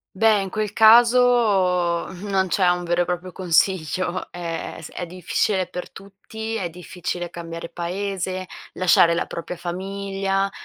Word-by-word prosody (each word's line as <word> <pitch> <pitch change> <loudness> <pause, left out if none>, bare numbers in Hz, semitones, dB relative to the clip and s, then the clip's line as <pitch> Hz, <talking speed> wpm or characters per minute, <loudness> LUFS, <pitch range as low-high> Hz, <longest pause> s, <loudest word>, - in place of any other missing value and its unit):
Beh, 215 +1 +4
in 195 - -3
quel 210 +1 -3
caso 220 -7 +4 0.2
non 195 -2 0
c'è 185 +1 +2
un 175 0 0
vero 175 +1 +1
e - - 0
proprio 180 +1 -4
consiglio 180 0 0
è 170 -2 -5
è - - -9
s - - -9
difficile 185 +2 -1
per 180 - -7
tutti, 210 +3 -8
è 190 -6 -2
difficile 175 0 -5
cambiare 170 -1 -7
paese, 185 +2 -3 0.3
lasciare 175 -2 +4
la 170 - -1
propria 170 +1 -6
famiglia, 195 +2 -2
185 Hz, 140 wpm, -22 LUFS, 175-200 Hz, 0.3 s, Beh